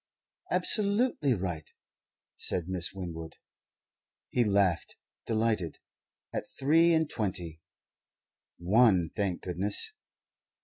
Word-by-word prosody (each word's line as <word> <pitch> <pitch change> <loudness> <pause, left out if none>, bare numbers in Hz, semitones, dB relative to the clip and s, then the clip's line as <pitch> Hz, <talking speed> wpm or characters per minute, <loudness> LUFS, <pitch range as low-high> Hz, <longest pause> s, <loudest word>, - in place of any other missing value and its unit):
"Absolutely 205 - +2
right," 90 -5 -4 0.7
said 90 -2 -1
Miss 95 0 0
Winwood. 85 -4 -7 0.9
He 125 - +2
laughed, 100 -5 +1 0.3
delighted. 110 -7 0 0.6
At - - -3
three 165 +5 +5
and 160 -1 +3
twenty, 90 - -4 1.0
one 95 -2 +4
thank 95 -4 -2
goodness! 95 - -1
100 Hz, 85 wpm, -30 LUFS, 85-125 Hz, 1.0 s, three